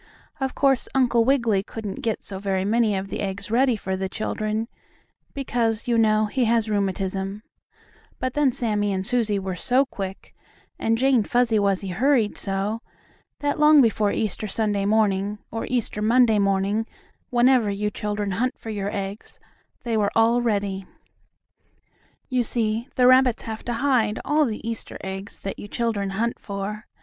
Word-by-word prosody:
Of 265 Hz, -1 st, -2 dB
course, 270 Hz, -3 st, +2 dB
Uncle 240 Hz, -3 st, +3 dB
Wiggily 235 Hz, -7 st, +2 dB
couldn't 205 Hz, -1 st, -6 dB
get 225 Hz, -2 st, -2 dB
so 195 Hz, -1 st, -4 dB
very 190 Hz, -1 st, -1 dB
many 220 Hz, 0 st, +2 dB
of 195 Hz, 0 st, -3 dB
the -, -, -4 dB
eggs 200 Hz, +1 st, -4 dB
ready 250 Hz, +1 st, +3 dB
for 190 Hz, -2 st, -3 dB
the 190 Hz, 0 st, -3 dB
children, 215 Hz, +2 st, -2 dB, 0.7 s
because, 235 Hz, -5 st, -1 dB
you 240 Hz, -, +2 dB
know, 215 Hz, -1 st, +3 dB
he 245 Hz, +4 st, 0 dB
has 230 Hz, -1 st, +2 dB
rheumatism, 195 Hz, 0 st, -2 dB, 0.7 s
but 255 Hz, 0 st, -2 dB
then 295 Hz, -3 st, +3 dB
Sammie 210 Hz, -4 st, 0 dB
and 190 Hz, 0 st, -2 dB
Susie 230 Hz, -4 st, +1 dB
were 190 Hz, -1 st, -3 dB
so 255 Hz, +8 st, +2 dB
quick, 195 Hz, -6 st, -7 dB, 0.5 s
and 225 Hz, 0 st, +1 dB
Jane 260 Hz, -1 st, +3 dB
Fuzzy 235 Hz, 0 st, +2 dB
Wuzzy 195 Hz, -1 st, 0 dB
hurried 230 Hz, +3 st, +2 dB
so, 200 Hz, +3 st, -2 dB, 0.6 s
that 290 Hz, 0 st, -1 dB
long 300 Hz, 0 st, +7 dB
before 220 Hz, -4 st, +3 dB
Easter 215 Hz, 0 st, -2 dB
Sunday 205 Hz, -1 st, 0 dB
morning, 205 Hz, -1 st, +1 dB
or 225 Hz, -, -4 dB
Easter 235 Hz, -4 st, -1 dB
Monday 225 Hz, 0 st, +4 dB
morning, 200 Hz, +3 st, +1 dB, 0.4 s
whenever 245 Hz, -3 st, +4 dB
you 205 Hz, +1 st, -1 dB
children 205 Hz, -1 st, -3 dB
hunt 240 Hz, +7 st, -1 dB
for 225 Hz, -, -7 dB
your 200 Hz, -1 st, -2 dB
eggs, 200 Hz, +1 st, -6 dB, 0.4 s
they 235 Hz, -2 st, -1 dB
were 205 Hz, -2 st, +2 dB
all 230 Hz, +2 st, +4 dB
ready. 200 Hz, -4 st, -1 dB, 1.4 s
You 255 Hz, -2 st, +1 dB
see, 230 Hz, 0 st, -1 dB
the 250 Hz, -, +4 dB
rabbits 255 Hz, -1 st, +5 dB
have 220 Hz, -1 st, -6 dB
to 240 Hz, -, -1 dB
hide 230 Hz, -4 st, +1 dB
all 300 Hz, +2 st, +3 dB
the 225 Hz, -2 st, -4 dB
Easter 230 Hz, -1 st, -5 dB
eggs 190 Hz, +1 st, -6 dB
that 195 Hz, -, -5 dB
you -, -, -7 dB
children 215 Hz, -3 st, -1 dB
hunt 235 Hz, +1 st, -1 dB
for. 205 Hz, +2 st, -5 dB
220 Hz, 160 wpm, -24 LUFS, 200-240 Hz, 1.4 s, long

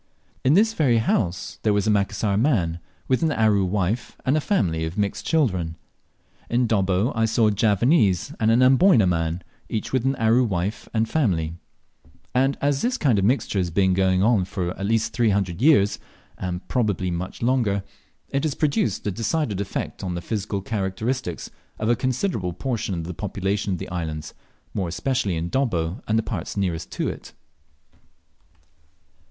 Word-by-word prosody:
In 135 Hz, +4 st, +4 dB
this 220 Hz, +3 st, +4 dB
very 135 Hz, -, +3 dB
house 95 Hz, -5 st, -1 dB
there 105 Hz, -, +2 dB
was 100 Hz, 0 st, +1 dB
a 110 Hz, -, +3 dB
Macassar 100 Hz, 0 st, +1 dB
man, 100 Hz, -, +1 dB, 0.3 s
with 130 Hz, -, +1 dB
an 160 Hz, -1 st, +2 dB
Aru 110 Hz, -6 st, +3 dB
wife 100 Hz, +4 st, -1 dB
and 130 Hz, +3 st, +3 dB
a 155 Hz, -, +2 dB
family 85 Hz, -, 0 dB
of 80 Hz, +4 st, -4 dB
mixed 100 Hz, -1 st, -2 dB
children. 95 Hz, -, +1 dB, 0.7 s
In 120 Hz, +1 st, +2 dB
Dobbo 100 Hz, +1 st, +1 dB
I 115 Hz, -1 st, +2 dB
saw 110 Hz, 0 st, +3 dB
a -, -, +1 dB
Javanese 105 Hz, -, +2 dB
and 110 Hz, -, +2 dB
an 120 Hz, +3 st, +5 dB
Amboyna 130 Hz, -, +5 dB
man, 85 Hz, -1 st, -1 dB, 0.3 s
each 110 Hz, -, -3 dB
with 130 Hz, -3 st, +2 dB
an 135 Hz, +1 st, +1 dB
Aru 115 Hz, +1 st, +3 dB
wife 100 Hz, -1 st, -2 dB
and 110 Hz, 0 st, +1 dB
family; 90 Hz, -, 0 dB, 0.8 s
and 135 Hz, +2 st, +2 dB
as 140 Hz, -1 st, +1 dB
this 250 Hz, +1 st, 0 dB
kind 125 Hz, -, +2 dB
of 95 Hz, -, +1 dB
mixture 115 Hz, -3 st, +1 dB
has 90 Hz, -2 st, 0 dB
been 95 Hz, +2 st, +2 dB
going 95 Hz, 0 st, +2 dB
on 110 Hz, -4 st, +3 dB
for 90 Hz, -2 st, -3 dB
at 100 Hz, +1 st, -3 dB
least 110 Hz, 0 st, +1 dB
three 120 Hz, -3 st, +2 dB
hundred 95 Hz, -2 st, -1 dB
years, 130 Hz, -9 st, +4 dB, 0.4 s
and 90 Hz, 0 st, -5 dB
probably 100 Hz, -7 st, 0 dB
much 90 Hz, +6 st, -5 dB
longer, 115 Hz, -6 st, +1 dB, 0.5 s
it 140 Hz, -, -1 dB
has 155 Hz, -3 st, -1 dB
produced 140 Hz, -9 st, 0 dB
a 105 Hz, -, 0 dB
decided 110 Hz, -, -1 dB
effect 100 Hz, 0 st, -4 dB
on 90 Hz, -2 st, -3 dB
the 85 Hz, -, -4 dB
physical 100 Hz, +1 st, -3 dB
characteristics 105 Hz, 0 st, -3 dB, 0.3 s
of 110 Hz, -, -1 dB
a 120 Hz, -, +4 dB
considerable 130 Hz, -, -1 dB
portion 110 Hz, 0 st, -2 dB
of 85 Hz, -, -3 dB
the 90 Hz, +2 st, -5 dB
population 100 Hz, +1 st, -2 dB
of -, -, -2 dB
the -, -, -7 dB
islands, 80 Hz, -4 st, -4 dB, 0.4 s
more 95 Hz, -3 st, -1 dB
especially 100 Hz, +2 st, -1 dB
in 80 Hz, +1 st, -3 dB
Dobbo 100 Hz, -8 st, -1 dB
and 110 Hz, -, +2 dB
the 110 Hz, -, +1 dB
parts 110 Hz, -, -5 dB
nearest 85 Hz, -5 st, -2 dB
to -, -, -1 dB
it. -, -, -7 dB
105 Hz, 175 wpm, -23 LUFS, 90-125 Hz, 0.8 s, an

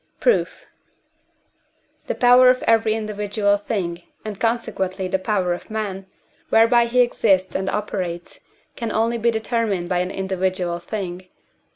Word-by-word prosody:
Proof. 485 Hz, -, +1 dB, 1.4 s
The -, -, -2 dB
power 250 Hz, +1 st, +6 dB
of 255 Hz, 0 st, +2 dB
every 225 Hz, -1 st, +3 dB
individual 210 Hz, -1 st, 0 dB
thing, 185 Hz, -4 st, -3 dB, 0.2 s
and 210 Hz, -2 st, -6 dB
consequently 200 Hz, -5 st, -1 dB
the 190 Hz, +1 st, -1 dB
power 185 Hz, -3 st, 0 dB
of 175 Hz, -, -8 dB
man, 200 Hz, -3 st, -4 dB, 0.4 s
whereby 235 Hz, +1 st, +5 dB
he 250 Hz, +2 st, +3 dB
exists 195 Hz, -6 st, +2 dB
and 190 Hz, 0 st, -1 dB
operates, 185 Hz, -5 st, -4 dB, 0.4 s
can 230 Hz, -2 st, -4 dB
only 230 Hz, +1 st, 0 dB
be 235 Hz, +1 st, +2 dB
determined 220 Hz, -5 st, -1 dB
by 180 Hz, -1 st, +1 dB
an 180 Hz, 0 st, -1 dB
individual 185 Hz, -2 st, -2 dB
thing 185 Hz, -1 st, -5 dB
(I. -, -, -35 dB
205 Hz, 140 wpm, -22 LUFS, 185-225 Hz, 1.4 s, power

